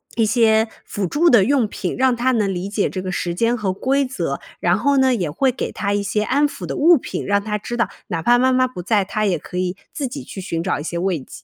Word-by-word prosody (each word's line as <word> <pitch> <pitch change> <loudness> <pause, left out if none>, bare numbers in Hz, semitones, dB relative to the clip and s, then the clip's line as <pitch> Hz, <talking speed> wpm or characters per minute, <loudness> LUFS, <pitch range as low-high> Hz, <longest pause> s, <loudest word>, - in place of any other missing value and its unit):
一 225 - +2
些 220 0 +3 0.2
辅 205 - -3
助 320 - +3
的 230 -9 +6
用 265 -1 +2
品， 190 -3 -4
让 260 -1 +3
他 245 +2 +1
能 210 -5 +1
理 180 +2 -4
解 205 0 0
这 185 - -4
个 185 0 -4
时 175 -1 -2
间 230 +5 +1
和 200 -4 -1
规 270 +7 +1
则， 170 - -3 0.2
然 175 +1 +3
后 280 +6 +2
呢， 265 -1 +4
也 185 -9 -1
会 260 - +1
给 250 - -4
他 200 - -2
一 205 - 0
些 210 +1 0
安 285 +6 +2
抚 - - -8
的 - - -4
物 335 +3 +6
品， - - -5
让 200 0 +1
他 210 0 -2
知 240 +3 -6
道 235 - +1 0.2
哪 165 -2 -3
怕 240 +8 +4
妈 260 +1 +3
妈 255 0 +3
不 250 -8 -8
在， 205 +2 +2
他 215 +2 -1
也 185 -4 +1
可 180 - -8
以 180 0 -1 0.2
自 285 -4 -2
己 270 +2 -7
去 - - -9
寻 165 -3 -3
找 185 - -1
一 - - -5
些 170 +2 -4
慰 180 -1 0
藉。 130 - -12
215 Hz, 295 characters per minute, -20 LUFS, 185-255 Hz, 0.2 s, 的